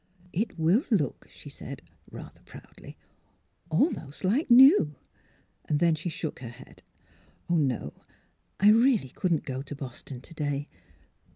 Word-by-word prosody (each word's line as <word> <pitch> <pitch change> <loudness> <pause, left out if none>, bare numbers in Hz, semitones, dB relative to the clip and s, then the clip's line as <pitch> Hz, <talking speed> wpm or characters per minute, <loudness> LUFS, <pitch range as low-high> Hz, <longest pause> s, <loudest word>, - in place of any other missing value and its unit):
'' 180 0 -27
It 210 - -13
will 170 - +3
look," 175 - -1
she - - -14
said, - - -9 0.3
rather - - -11
proudly, - - -14 0.4
" 170 - -38
al 280 - +3
most 145 +3 -8
like 235 - +1
new." 245 - +7 0.7
Then 160 +3 +3
she 155 +3 -3
shook 160 -1 -5
her 120 - -7
head. 125 +3 -15 0.7
"No; 145 -9 0 0.7
I 205 +2 +7
really 230 - +3
couldn't 165 +2 -1
go 130 -3 -4
to 145 +1 -7
Boston 130 -1 -8
to 150 - -11
day. 145 -2 -2
160 Hz, 145 wpm, -27 LUFS, 140-200 Hz, 0.7 s, new